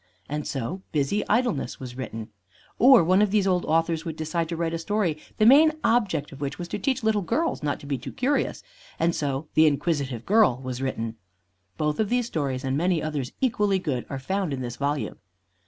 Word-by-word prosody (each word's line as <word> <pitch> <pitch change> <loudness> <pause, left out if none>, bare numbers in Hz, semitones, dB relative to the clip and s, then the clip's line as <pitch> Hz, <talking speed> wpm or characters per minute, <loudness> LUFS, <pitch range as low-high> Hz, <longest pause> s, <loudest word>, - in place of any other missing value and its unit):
And 150 +1 -3
so 140 +8 -4
"Busy 150 +8 +1
Idleness" 225 - 0
was 125 -2 -8
written. 115 -4 -6 0.5
Or 250 -4 +8
one 185 +4 +4
of 210 - +3
these 205 -1 +2
old 180 -2 +1
authors 165 0 +1
would 165 -3 -5
decide 160 +1 -2
to 170 - -2
write 165 0 -1
a 165 - -2
story 195 -2 0 0.2
the 215 - +4
main 300 +6 +7
object 195 -11 +1
of 140 - -11
which 140 0 -3
was 175 - -5
to - - -3
teach 260 +3 -1
little 215 -1 +2
girls 310 - -1
not 145 -2 -1
to - - -11
be 140 -2 -2
too 135 +2 -7
curious, 280 +3 -1 0.3
and 165 +1 +2
so 140 0 -2
"The 160 0 +6
Inquisitive 140 -5 -1
Girl" 205 - +4
was 130 0 -4
written. 115 -4 -3 0.6
Both 150 -1 -1
of 215 -2 +1
these 245 0 +1
stories, 140 - -2
and 135 0 -1
many 175 +3 +1
others 150 -5 -3
equally 210 -6 +2
good, 140 -9 -3
are 135 - -3
found 185 +4 -2
in 130 - -4
this 120 -1 -4
volume. 145 +1 -2
160 Hz, 205 wpm, -25 LUFS, 140-205 Hz, 0.6 s, Or